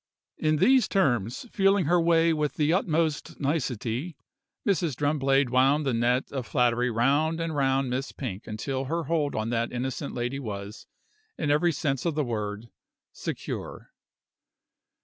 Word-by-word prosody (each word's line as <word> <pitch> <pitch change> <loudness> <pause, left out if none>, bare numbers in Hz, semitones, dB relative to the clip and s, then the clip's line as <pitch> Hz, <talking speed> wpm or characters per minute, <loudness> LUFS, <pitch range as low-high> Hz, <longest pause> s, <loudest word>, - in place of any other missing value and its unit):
In 155 0 +2
these 255 - +4
terms, 125 - 0
feeling 195 -2 +3
her 175 +3 +3
way 165 0 +4
with 150 -2 -1
the 150 +1 +2
utmost 165 -4 0
nicety, 135 0 -2 0.5
Mrs. 170 -7 +1
Drumblade 135 -2 +1
wound 135 +4 +3
the 135 - +1
net 120 +3 +1
of 130 -4 -4
flattery 125 0 +2
round 140 +8 +1
and 165 -2 -2
round 135 -2 +1
Miss 130 +4 -2
Pink 110 -7 -6
until 130 +5 -3
her 165 +5 -2
hold 155 -3 0
on 110 +2 -2
that 115 0 0
innocent 130 +3 -4
lady 120 +3 -2
was, 105 -2 -7 0.5
in 150 -2 0
every 170 +4 +3
sense 140 -4 -1
of 170 -3 -1
the 150 - +1
word, 105 -1 -4 0.4
secure. - - -6
140 Hz, 150 wpm, -27 LUFS, 120-160 Hz, 0.5 s, these